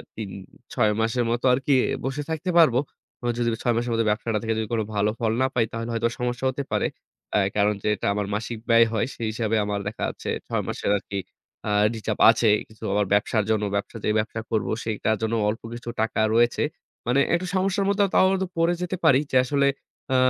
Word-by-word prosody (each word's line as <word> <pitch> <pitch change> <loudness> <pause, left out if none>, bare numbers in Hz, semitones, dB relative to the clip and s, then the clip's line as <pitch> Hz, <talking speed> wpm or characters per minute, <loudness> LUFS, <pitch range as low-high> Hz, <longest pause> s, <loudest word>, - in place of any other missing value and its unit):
৩-৬ 105 +3 -3
মাসের 120 +2 +1
মতো 120 +2 -1
আরকি 135 +2 +1 0.3
বসে 135 +2 -2
থাকতে 160 +3 -3
পারব। 160 -8 +6 0.5
বা 120 - -3
যদি 120 -1 +1
৬ 120 - +2
মাসের 120 0 -1
মধ্যে 115 -1 +1
ব্যবসাটা 110 0 0
থেকে 115 0 0
যদি 110 - -2
কোন 110 - +1
ভালো 105 +1 +2
ফল 115 -2 +1
না 130 - +4
পাই 115 -3 +2
তাহলে 115 +1 -4
হয়তো 115 +1 +1
সমস্যা 125 +1 -2
হতে 135 +2 -3
পারে। - - +1 0.5
এ্যা - - +4 0.2
কারণ 105 0 +3
যেটা 105 -2 0
আমার 105 0 -1
মাসিক 115 +2 -4
ব্যয় 115 0 +7
হয় 110 - +1
সেই 115 - -3
হিসাবে 110 0 -1
আমার 105 -1 -2
দেখা 110 - -5
যাচ্ছে - - -6 0.2
৬ - - -1
মাসের - - -2
আরকি 100 0 -6 0.5
আ - - 0
reserve 105 +1 +4
আছে। 110 -1 -3 0.5
কিছু 110 - -16
আমার 105 0 +2
ব্যবসার 105 +1 +2
জন্য, 110 -1 +1
ব্যবসা 100 +3 -3
যে - - +2
ব্যবসা 110 +1 -3
করব 105 -4 0 0.2
সেটার 110 0 0
জন্য 110 +1 -1 0.2
অল্প 110 - -3
কিছু 120 0 -7
টাকা 110 - -1 0.2
রয়েছে। 120 +1 +3 0.4
মানে 125 +3 +3
একটু 175 +1 +1
সমস্যার 195 +1 +1
মধ্যেও 200 0 +3
তাও - - +5
হয়তো 190 0 0
পড়ে 165 +1 +3
যেতে 180 +1 -2
পারি 135 -4 +6
যে - - -2
আসলে 140 +1 +2 0.5
আ - - +3
115 Hz, 205 wpm, -24 LUFS, 105-130 Hz, 0.5 s, ব্যয়